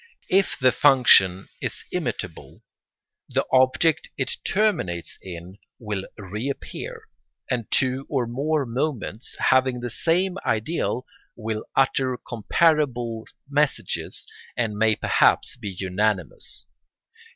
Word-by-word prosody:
If 195 +1 +3
the 130 -3 +4
function 120 -11 +5
is - - -4
imitable, - - -5 0.7
the - - +1
object 130 +5 +3
it 135 - -1
terminates 190 - 0
in 90 +1 -9 0.2
will 105 -4 -4
reappear, 105 +8 -5 0.5
and 120 -4 -1
two 130 +1 +1
or 130 -4 +1
more 140 +5 0
moments, 125 -2 -3
having 130 -1 +3
the 120 -1 -4
same 180 +7 +1
ideal, 125 +2 -1 0.3
will 110 -1 -4
utter 130 -1 +2
comparable 120 -2 +1 0.2
messages 145 +1 -1 0.3
and 115 -3 0
may 110 +1 +3
perhaps - - +3
be 110 -4 -6
unanimous. 95 +1 -2
125 Hz, 105 wpm, -24 LUFS, 110-140 Hz, 0.7 s, function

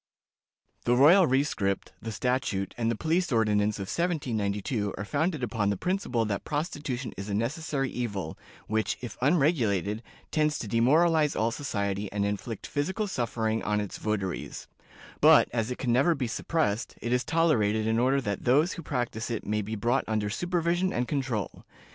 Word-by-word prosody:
The 120 - +3
royal 165 +8 +7
rescript, 125 -8 0
the 115 - -5
statute, 120 -5 -1
and 115 -1 0
the 115 - 0
police 165 - 0
ordinance 105 -2 +2
of - - -6
1792 110 - -1
are 100 - -4
founded 155 - -1
upon 105 -3 0
the 100 - 0
principle 180 - 0
that 100 -2 -2
prostitution 145 -5 -3
is 100 +2 -6
a 100 - -1
necessary 135 - -1
evil, 100 -9 -3 0.3
which, 110 0 -1
if 120 -4 -6
unregulated, 120 - +2 0.3
tends 155 -1 +1
to 110 - -5
demoralize 150 +7 +3
all 115 +1 +1
society, 100 -6 -2
and 100 0 0
inflict 105 +2 -4
physical 190 +9 -1
suffering 115 - -1
on 105 0 0
its 105 -2 -5
votaries; 105 -4 -3 0.5
but, - - +7
as 115 -1 0
it 125 - -3
can 120 -2 0
never 140 +7 +4
be 135 -3 -2
suppressed, 120 -1 -1
it 120 - -2
is 125 0 +2
tolerated 120 -10 +2
in 110 +1 +1
order 130 +3 +3
that 100 -7 -3
those 150 +8 +3
who 170 - -7
practice 120 -6 -3
it 115 -3 -3
may 105 +1 0
be 110 +2 -4
brought 120 +5 +1
under 105 -2 -1
supervision 175 - 0
and 120 +1 -1
control. 130 - -2
120 Hz, 165 wpm, -28 LUFS, 105-145 Hz, 0.5 s, royal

